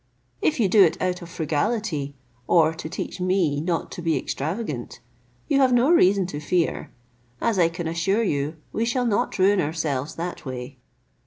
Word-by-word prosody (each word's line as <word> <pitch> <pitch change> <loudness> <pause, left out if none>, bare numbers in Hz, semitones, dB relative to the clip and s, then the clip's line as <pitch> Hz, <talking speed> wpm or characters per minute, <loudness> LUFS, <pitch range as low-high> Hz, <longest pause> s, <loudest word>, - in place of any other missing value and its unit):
If 155 - +1
you 215 - +4
do 200 +1 +6
it 165 - +2
out 180 -1 -1
of 170 - -9
frugality, 160 -2 -2 0.3
or 160 -2 +4
to 160 -1 -7
teach 180 +1 -5
me 180 -6 +1
not 170 -1 -2
to - - -6
be 165 -2 +1
extravagant, 150 - -4 0.5
you 275 - +2
have 260 -2 +4
no 245 +6 +4
reason 195 - +4
to 150 -5 -5
fear, 165 +2 -1 0.5
as 220 -5 +1
I 165 -1 +4
can 170 0 -5
assure 190 +7 +1
you 150 -4 -1 0.2
we 225 - 0
shall 245 +2 0
not 215 -4 0
ruin 195 0 +4
ourselves 150 -3 -2
that 175 +2 -5
way. 130 0 -7
170 Hz, 175 wpm, -24 LUFS, 155-200 Hz, 0.5 s, do